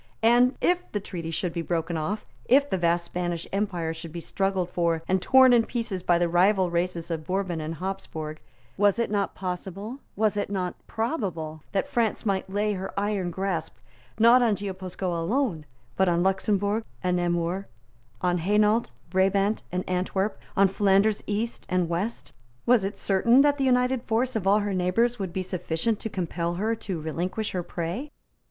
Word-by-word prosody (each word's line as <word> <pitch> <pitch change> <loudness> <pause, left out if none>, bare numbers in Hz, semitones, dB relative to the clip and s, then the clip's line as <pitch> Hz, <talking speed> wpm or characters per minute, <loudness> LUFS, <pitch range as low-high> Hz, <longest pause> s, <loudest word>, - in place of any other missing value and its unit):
And, 240 +3 +5
if 360 0 +1
the 205 - 0
Treaty 170 -4 -6
should 165 +1 -2
be 170 - -2
broken 165 0 -2
off, 190 +7 -2 0.2
if 280 +3 +5
the 190 - -1
vast 170 0 +2
Spanish 175 -1 -3
empire 180 -5 -1
should 165 0 -8
be 170 - -5
struggled 190 0 -1
for 170 -2 0
and 185 0 +2
torn 260 +4 +6
in 235 -1 +5
pieces 225 -6 -3
by 175 -1 +3
the 175 0 +2
rival 185 +1 +3
races 175 0 -1
of 160 -1 -2
Bourbon 185 -3 -1
and 155 +1 -4
Habsburg, 160 -4 -5 0.4
was 205 +1 +4
it 235 -2 0
not 200 -2 0
possible, 195 +6 -5 0.2
was 215 0 +1
it 205 - -1
not 185 -3 -2
probable, 185 - -3
that 195 - 0
France 230 -1 0
might 195 -2 0
lay 205 +2 0
her 190 0 -4
iron 200 -3 -1
grasp, 185 -2 -3 0.4
not 235 +3 +7
on 225 -4 +3
Guipuscoa 185 -3 -4
alone, 180 - -1 0.3
but 190 -1 +3
on 170 0 +2
Luxemburg 200 +3 +1 0.2
and 180 -1 +1
Namur, 175 +2 -1 0.5
on 180 -1 +1
Hainault, 210 +5 +3 0.3
Brabant 195 +3 +2
and 180 +1 -2
Antwerp, 190 +2 -1 0.2
on 195 0 +6
Flanders 200 +2 +2
East 215 +3 -2
and 180 -2 +1
West? 180 +7 -3 0.3
Was 240 -4 +4
it 195 +1 -3
certain 235 +7 +4
that 290 0 +3
the 270 - +2
united 250 0 +2
force 245 +2 0
of 200 -4 -1
all 205 +2 +5
her 205 -1 -2
neighbours 210 +7 +1
would 190 -3 -3
be 185 +2 -2
sufficient 185 +4 -1
to 220 - -4
compel 170 -2 -2
her 215 +5 0
to 190 -6 -4
relinquish 175 +7 -3
her 180 - -2
prey? 175 - -4
190 Hz, 175 wpm, -26 LUFS, 175-215 Hz, 0.5 s, not